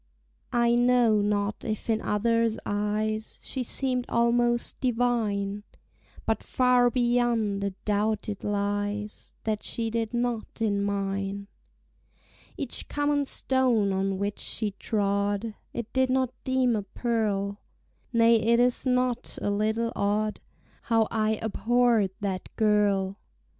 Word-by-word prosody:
I 235 0 +4
KNOW 240 -3 +4
not 205 0 -1
if 215 -2 -4
in 220 -1 +1
others' 230 +1 +1
eyes 215 +1 -1
She 265 - -2
seem'd 250 0 -1
almost 240 0 +2
divine; 225 -5 0 0.6
But 220 -1 0
far 250 -1 +3
beyond 240 -4 +1
a 200 - +1 0.2
doubt 210 +1 0
it 205 -2 -5
lies 205 +1 -2
That 215 -1 -1
she 225 -1 -2
did 225 -1 -1
not 240 -2 -2
in 205 -3 +1
mine. 200 0 -2 1.1
Each - - -2
common 290 -1 0
stone 250 -7 +1
on 195 0 0
which 200 +1 -3
she 215 -2 0
trod 200 +1 -1 0.2
I 235 - -4
did 260 0 +2
not 260 -1 +1
deem 260 -2 +2
a 210 - 0
pearl: 205 -1 -1 0.5
Nay 230 0 +5
it 235 +2 +3
is 245 +2 +2
not 250 -1 0
a 205 - -1
little 220 +3 0
odd 210 +1 0 0.4
How 225 -2 +2
I 220 -1 +1
abhorr'd 230 -1 +2
that 190 -3 -3
girl. 205 -2 +2
220 Hz, 125 wpm, -27 LUFS, 205-240 Hz, 1.1 s, Nay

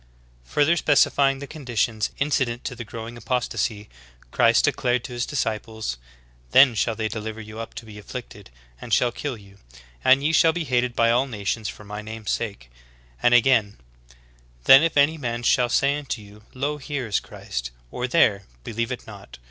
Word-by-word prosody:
''^ - - -31 0.5
26. - - -15
Further 155 +4 +4
specifying 140 -2 +3
the 140 - -7
conditions 120 -7 -2
incident 130 -4 0
to 125 - -5
the 120 - -6
growing 115 +1 -8
apostasy, 120 -4 -2 0.4
Christ - - +4
declared 125 -1 0
to 125 - -7
His 120 0 -2
disciples: 110 - -3 0.5
"Then 130 -2 +7
shall 115 0 0
they 110 0 -2
deliver 110 0 -5
you 110 0 -9
up 115 - -7
to 115 - -8
be 105 -1 -11
afflicted, 100 - -9 0.3
and 115 - -9
shall 120 +3 +3
kill 130 0 -5
you; 100 -1 -18 0.4
and 135 +2 +5
ye 155 - +2
shall 165 0 +4
be 175 - -2
hated 125 -3 0
by 115 0 +3
all 125 +3 +2
nations 105 -2 -3
for - - -10
my 105 +1 -7
name's 110 -1 -5
sake."^ - - -3 0.6
And 120 0 +5
again: 115 -4 +3 0.9
"Then 135 - +9
if 165 -2 0
any 150 +3 +4
man 120 -3 -3
shall 120 0 +3
say 140 +4 +2
unto 140 -5 -4
you, 105 0 -15
Lo 145 +3 -2
here 140 -2 -4
is 105 -4 0
Christ, - - -6 0.2
or 125 - -3
there, 105 -9 +3 0.2
believe 115 - -3
it - - -5
not. - - -12
120 Hz, 185 wpm, -24 LUFS, 110-135 Hz, 0.9 s, Then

